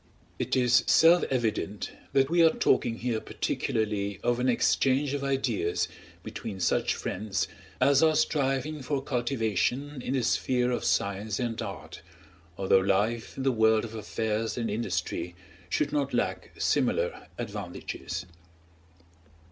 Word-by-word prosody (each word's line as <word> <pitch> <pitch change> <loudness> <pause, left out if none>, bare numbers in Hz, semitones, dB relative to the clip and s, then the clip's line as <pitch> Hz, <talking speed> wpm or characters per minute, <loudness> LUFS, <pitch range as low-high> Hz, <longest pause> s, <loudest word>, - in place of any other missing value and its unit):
It - - 0
is 125 -1 +4
self 170 +2 +6
evident 110 -5 -1 0.2
that 135 -1 +4
we 170 +2 +4
are 165 - +8
talking 120 -6 +1
here 120 -2 -1
particularly 100 -3 -2
of 120 0 +1
an 125 +1 +2
exchange 135 +3 +2
of 140 -1 -2
ideas 125 -10 0 0.4
between 95 - -6
such - - +1
friends 100 +1 -2 0.3
as 140 0 +5
are 160 -1 +4
striving 140 0 0
for 135 +1 -2
cultivation 125 +2 -1
in 130 - -2
the 130 - +1
sphere 125 +1 +1
of 120 - -2
science 100 +1 0
and 120 -2 -2
art; 80 -5 -7 0.6
although 95 0 +4
life 105 +5 0
in 135 - -3
the 135 - +3
world 110 -1 +3
of 115 - -9
affairs 110 +1 -2
and 115 -3 -1
industry 105 -5 -2 0.3
should 145 +9 0
not 140 -3 0
lack - - -1
similar - - 0
advantages. 105 -8 -5
120 Hz, 135 wpm, -28 LUFS, 105-135 Hz, 0.6 s, are